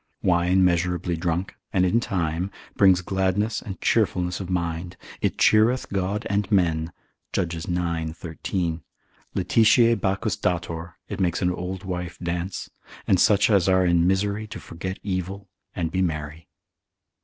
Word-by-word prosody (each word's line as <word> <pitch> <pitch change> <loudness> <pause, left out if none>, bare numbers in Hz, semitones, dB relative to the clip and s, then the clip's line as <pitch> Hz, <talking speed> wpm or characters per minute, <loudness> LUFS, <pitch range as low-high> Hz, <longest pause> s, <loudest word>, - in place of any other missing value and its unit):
Wine 90 +1 +3
measurably 90 0 +1
drunk, 85 +2 -2 0.2
and 95 -1 +3
in 110 +6 +3
time, 90 -4 -1 0.3
brings 95 -2 +5
gladness 95 +4 0
and 95 -3 -7
cheerfulness 90 -5 +1
of 95 -2 -6
mind, 85 0 -2 0.2
it - - 0
cheereth 115 +4 +4
God 100 +3 -1
and 100 0 -1
men, 85 -4 +2 0.4
Judges 85 -2 -2
ix. 85 -2 -2
13. 85 0 -3 0.5
laetitiae 115 +5 +4
Bacchus 100 +2 0
dator, 85 -1 -2
it - - -5
makes 90 0 0
an 90 - +2
old 90 +2 -5
wife 90 -2 -4
dance, 85 +1 -4 0.3
and 95 - +3
such 100 -1 +5
as 95 -3 +4
are 95 0 +4
in 85 -1 +3
misery 100 +3 0
to 110 - -7
forget 95 +3 -6
evil, 95 +1 -3 0.3
and 85 -3 -2
be 95 - 0
merry. 80 -2 -3
90 Hz, 145 wpm, -24 LUFS, 85-95 Hz, 0.5 s, brings